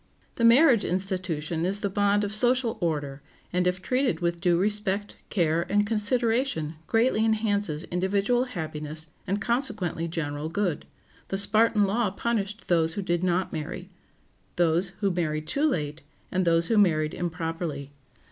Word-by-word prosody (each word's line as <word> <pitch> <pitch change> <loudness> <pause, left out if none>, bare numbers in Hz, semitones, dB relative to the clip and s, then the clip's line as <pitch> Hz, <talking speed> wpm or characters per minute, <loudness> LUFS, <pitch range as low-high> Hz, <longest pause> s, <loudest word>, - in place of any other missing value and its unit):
] - - -36
The 230 - -1
marriage 235 -1 +6
institution 175 -4 -2
is 195 +3 -1
the 205 - 0
bond 205 +1 +2
of 205 0 -3
social 240 +2 +2
order, 145 -4 -2 0.3
and 180 0 +2
if 180 +1 -1
treated 255 +3 +1
with 170 -1 -1
due 175 -2 +3
respect, 205 +1 -1
care, 170 -4 +1
and 205 +1 +3
consideration 225 - +1
greatly 225 0 +2
enhances 205 -7 0
individual 200 +8 0
happiness 155 - -4 0.2
and 195 +3 0
consequently 215 - 0
general 155 -2 -3
good. 180 -3 -2 0.4
The 195 - -2
Spartan 215 +1 +3
law 210 +2 +1
punished 210 +1 -3
those 165 -2 +2
who 200 - -3
did 175 -2 0
not 185 0 0
marry, 180 +5 -6 0.6
those 175 +2 +2
who 200 -2 +2
married 155 -3 -2
too 280 - 0
late, 150 - -2 0.3
and 185 -1 0
those 165 0 +3
who 220 +4 +2
married 155 -6 +2
improperly. 165 -4 -4
185 Hz, 150 wpm, -26 LUFS, 165-210 Hz, 0.6 s, marriage